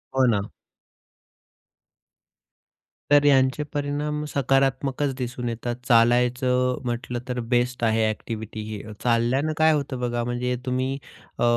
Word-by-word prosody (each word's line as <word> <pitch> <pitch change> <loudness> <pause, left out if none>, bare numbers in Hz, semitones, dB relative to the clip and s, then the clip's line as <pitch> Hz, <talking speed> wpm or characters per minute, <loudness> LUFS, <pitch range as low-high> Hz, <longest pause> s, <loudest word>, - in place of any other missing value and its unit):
हो 130 -1 +4
ना. 100 0 -1 2.6
तर 145 0 +6
यांचे 135 0 +4
परिणाम 145 +1 -2
सकारात्मकच 135 0 +1
दिसून 125 -1 -3
येतात. 120 +1 -3
चालायचं 125 +1 +3
म्हटलं, 120 0 -3
तर 125 -1 -2
बेस्ट 125 0 +1
आहे 110 -1 +3
एक्टिव्हिटी 110 0 -5
ही. 105 -2 -5 0.2
चालल्यानं 125 +6 +1
काय 160 0 +5
होतं 140 -3 -2
बघा, 120 -1 -1
म्हणजे 125 +1 -1
तुम्ही 130 +1 -1 0.4
अ, - - +1
125 Hz, 115 wpm, -24 LUFS, 120-135 Hz, 2.6 s, तर